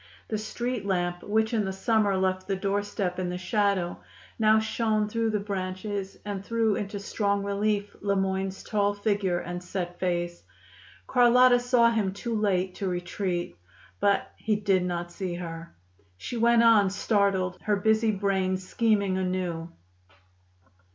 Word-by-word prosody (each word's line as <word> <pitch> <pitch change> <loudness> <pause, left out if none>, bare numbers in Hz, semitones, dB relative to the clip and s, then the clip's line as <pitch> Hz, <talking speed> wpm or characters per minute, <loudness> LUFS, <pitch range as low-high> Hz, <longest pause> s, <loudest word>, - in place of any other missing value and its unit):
The 215 - -1
street 240 +2 -3
lamp, 175 -2 -1
which 220 +2 0
in 220 -2 +2
the 190 - -2
summer 205 0 +1
left 185 0 0
the 195 - 0
doorstep 195 -1 -2
in 180 -1 -1
the 180 - -3
shadow, 195 -2 0 0.4
now 220 0 +5
shone 220 -1 0
through 225 +1 0
the 215 -1 0
branches 195 0 -4
and 200 -2 -4
threw 225 -1 +1
into 200 0 -4
strong 200 0 -1
relief 205 0 -1
Le 200 -1 +1
Moyne's 190 0 -1
tall 205 -1 0
figure 205 -3 0
and 175 +1 -5
set 175 -1 -5
face. 175 -1 -1 0.6
Carlotta 250 0 +5
saw 245 -1 +4
him 210 -4 0
too 230 +4 -4
late 190 -4 +1
to 195 - -4
retreat. 175 - -3 0.4
But 200 0 +1
he 215 -1 0
did 200 -3 +1
not 175 -1 -3
see 180 -1 -4
her. 165 - -7 0.4
She 245 - -6
went 235 0 +4
on, 215 -4 +6
startled, 195 -2 +1
her 210 - +1
busy 220 +2 +2
brain 190 -2 0
scheming 200 0 +1
anew. 180 -3 -2
200 Hz, 150 wpm, -27 LUFS, 185-215 Hz, 0.6 s, on